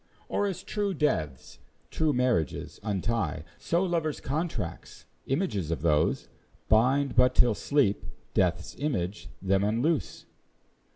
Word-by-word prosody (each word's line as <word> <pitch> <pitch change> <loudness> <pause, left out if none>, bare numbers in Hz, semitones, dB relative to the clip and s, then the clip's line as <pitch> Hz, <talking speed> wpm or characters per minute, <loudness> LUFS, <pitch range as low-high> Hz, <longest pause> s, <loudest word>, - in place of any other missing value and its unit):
Or, 205 - +1
as 190 -4 -4
true 205 -2 -2
deaths 80 - -1 0.3
true 155 -1 +1
marriages 125 - 0
untie, 105 -4 -1 0.2
So 170 +2 +1
lovers' 165 -4 -1
contracts, 155 +5 -4 0.2
images 135 - -1
of 85 -1 -2
those, 75 -2 +2 0.4
Bind 130 +5 +3
but 125 0 +5
till 120 -2 +5
Sleep, 130 -3 +1 0.3
Death's 90 -1 +1
image, 90 - -2
them 95 +1 +2
unloose? 120 +10 0
125 Hz, 115 wpm, -28 LUFS, 95-150 Hz, 0.4 s, but